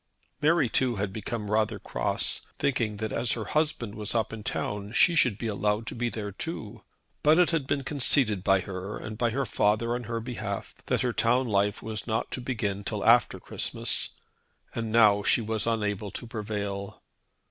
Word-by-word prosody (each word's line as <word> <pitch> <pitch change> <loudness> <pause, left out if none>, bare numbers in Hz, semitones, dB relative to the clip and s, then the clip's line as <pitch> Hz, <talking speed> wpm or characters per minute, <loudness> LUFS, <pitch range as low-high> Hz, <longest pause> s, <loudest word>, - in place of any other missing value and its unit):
Mary 155 -2 +4
too 125 +1 +1
had 100 -1 -2
become 105 0 -4
rather 110 0 +2
cross, - - -1 0.2
thinking 115 -6 0
that 110 0 -3
as 115 0 +1
her 110 -3 -4
husband 150 -8 0
was 105 +1 -2
up 115 -1 0
in 110 - -6
town 105 0 -3
she 175 - +5
should 125 -10 +3
be 115 - -5
allowed 105 +1 0
to - - -5
be 120 0 -1
there 105 -3 -5
too. 110 - -6 0.4
But 155 +2 +5
it 180 -1 +5
had 155 -5 0
been 140 -1 0
conceded 130 -7 +2
by 95 -1 +4
her, 95 +2 -5
and 110 - -6
by 120 +2 +1
her 135 +4 -1
father 110 +2 +1
on 120 0 -3
her 115 +1 -2
behalf, 120 0 -5
that - - +1
her 125 -2 0
town 125 +3 +2
life 100 -1 +1
was 110 0 -4
not 110 0 -1
to 130 - -3
begin 110 -6 -2
till 105 -1 -3
after 120 +1 +5
Christmas, - - -1 0.6
and 115 -2 -3
now 105 -3 +6
she 100 - +3
was 110 -1 -2
unable 105 -2 -1
to 120 - -4
prevail. 105 -3 -4
110 Hz, 190 wpm, -28 LUFS, 105-120 Hz, 0.6 s, now